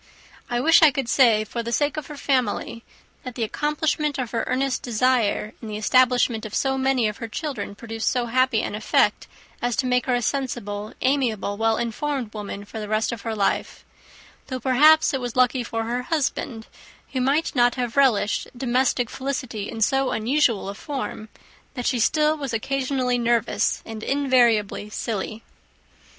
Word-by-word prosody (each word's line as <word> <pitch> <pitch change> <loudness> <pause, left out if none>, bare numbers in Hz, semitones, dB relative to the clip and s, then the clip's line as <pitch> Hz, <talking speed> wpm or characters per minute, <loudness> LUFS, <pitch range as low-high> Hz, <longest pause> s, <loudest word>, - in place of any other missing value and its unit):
I 240 - 0
wish 325 +6 +5
I 315 - +8
could 270 -3 -3
say, 230 -5 +4
for 235 +2 -4
the 235 0 -5
sake 290 +3 +1
of 305 - -5
her 295 - -9
family, 250 -4 -1 0.4
that 255 -2 -8
the 235 - -2
accomplishment 300 +4 -1
of 255 -4 -3
her 230 -1 -1
earnest 265 0 0
desire 235 -3 +1
in 225 - -7
the 210 -1 -4
establishment 245 0 +3
of 215 - -6
so 270 -1 +1
many 265 -3 +1
of 210 - -4
her 230 - -5
children 225 -5 -5
produced 225 +1 -3
so 250 -2 0
happy 255 -1 +2
an - - -3
effect 215 +1 +1 0.3
as 245 -1 0
to 260 - 0
make 250 0 +1
her 250 - +2
a 245 - -1
sensible, 215 -6 -3
amiable, 245 -7 0
well 225 +1 +1
informed 240 0 -3
woman 205 -1 -6
for 220 - -8
the 210 - -5
rest 215 +1 0
of 235 -3 -6
her 225 0 -3
life; 200 -2 -1 0.6
though, 260 -1 -4
perhaps, 300 +6 +5
it 270 - -1
was 245 -2 -4
lucky 255 0 +3
for 225 -1 -3
her 240 +2 -2
husband, 255 -6 -2 0.5
who 260 - 0
might 285 +5 +1
not 245 -1 +4
have 245 -3 -3
relished 235 -7 +2
domestic 250 0 +1
felicity 255 -5 -4
in 225 - -6
so 270 +3 +2
unusual 235 -3 +1
a 200 - -4
form, 235 -2 -6 0.5
that 245 -2 -4
she 250 - +1
still 305 +7 +3
was 275 -5 -5
occasionally 255 +1 -1
nervous 235 -2 +1
and 220 -1 -7
invariably 240 -7 +2
silly. 215 0 -4
245 Hz, 175 wpm, -23 LUFS, 220-270 Hz, 0.6 s, I